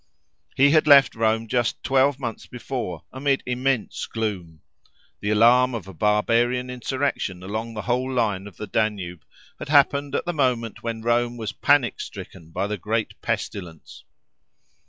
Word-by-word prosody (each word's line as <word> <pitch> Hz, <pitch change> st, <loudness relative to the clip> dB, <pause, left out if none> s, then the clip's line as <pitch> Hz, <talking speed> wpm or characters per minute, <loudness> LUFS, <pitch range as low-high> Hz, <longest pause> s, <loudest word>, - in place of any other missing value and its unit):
He 140 Hz, +1 st, +5 dB
had 155 Hz, 0 st, +4 dB
left 140 Hz, -3 st, +7 dB
Rome 110 Hz, 0 st, 0 dB
just 120 Hz, 0 st, -1 dB
twelve 135 Hz, +1 st, +3 dB
months 120 Hz, -4 st, -5 dB
before, 120 Hz, -, -5 dB
amid 135 Hz, +1 st, 0 dB
immense 125 Hz, -1 st, -1 dB
gloom. 95 Hz, -8 st, -4 dB, 0.6 s
The 105 Hz, -, -3 dB
alarm 120 Hz, +4 st, +5 dB
of 100 Hz, -5 st, -6 dB
a 95 Hz, -, -9 dB
barbarian 115 Hz, +5 st, +1 dB
insurrection 125 Hz, -7 st, -2 dB
along 110 Hz, +4 st, -4 dB
the 105 Hz, -, -4 dB
whole 125 Hz, +2 st, -1 dB
line 105 Hz, -6 st, 0 dB
of 95 Hz, -, -14 dB
the 105 Hz, -, -5 dB
Danube 100 Hz, -7 st, -2 dB, 0.4 s
had -, -, -7 dB
happened 140 Hz, -1 st, +3 dB
at -, -, -1 dB
the 175 Hz, -, -2 dB
moment 125 Hz, -, 0 dB
when 115 Hz, -1 st, -4 dB
Rome 120 Hz, +1 st, +1 dB
was 110 Hz, -2 st, -4 dB
panic 145 Hz, -4 st, +2 dB
stricken 85 Hz, -4 st, -9 dB
by 85 Hz, -, -2 dB
the 105 Hz, +1 st, -3 dB
great 110 Hz, +3 st, -3 dB
pestilence. 85 Hz, -5 st, -5 dB
115 Hz, 155 wpm, -24 LUFS, 105-130 Hz, 0.6 s, left